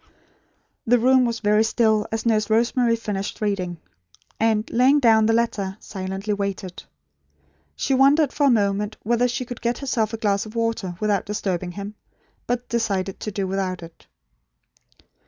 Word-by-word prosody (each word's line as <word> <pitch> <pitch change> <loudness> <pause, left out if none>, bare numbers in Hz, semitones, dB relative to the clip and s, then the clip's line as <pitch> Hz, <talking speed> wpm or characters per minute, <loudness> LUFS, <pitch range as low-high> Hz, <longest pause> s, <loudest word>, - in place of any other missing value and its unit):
'" - - -42
The 245 - +7
room 255 +2 +4
was 230 -1 -2
very 210 +1 +3
still, 220 -2 +2
as 225 +1 -3
Nurse 215 -2 +1
Rosemary 235 +1 +2
finished 210 -3 -4
reading; 190 -5 -2 0.6
and, 220 -1 +1
laying 260 +5 +4
down 220 -4 +4
the - - +3
letter, 210 -4 -1
silently 195 +1 -4
waited. 200 -2 -4 0.9
She 275 - -1
wondered 275 +2 +4
for 290 -1 +2
a - - +5
moment 210 -2 +1
whether 240 +3 +2
she 245 +1 -3
could 245 -1 -8
get 235 0 -1
herself 235 -6 -1
a 225 - -4
glass 200 -2 0
of 215 - -12
water, 230 -6 -2
without 210 -2 0
disturbing 185 -4 -3
him; 200 +2 -6 0.5
but 245 0 -2
decided 200 -5 -2
to 215 - -4
do 200 -1 -2
without 185 -2 -3
it. 165 0 -14
215 Hz, 160 wpm, -23 LUFS, 200-235 Hz, 0.9 s, The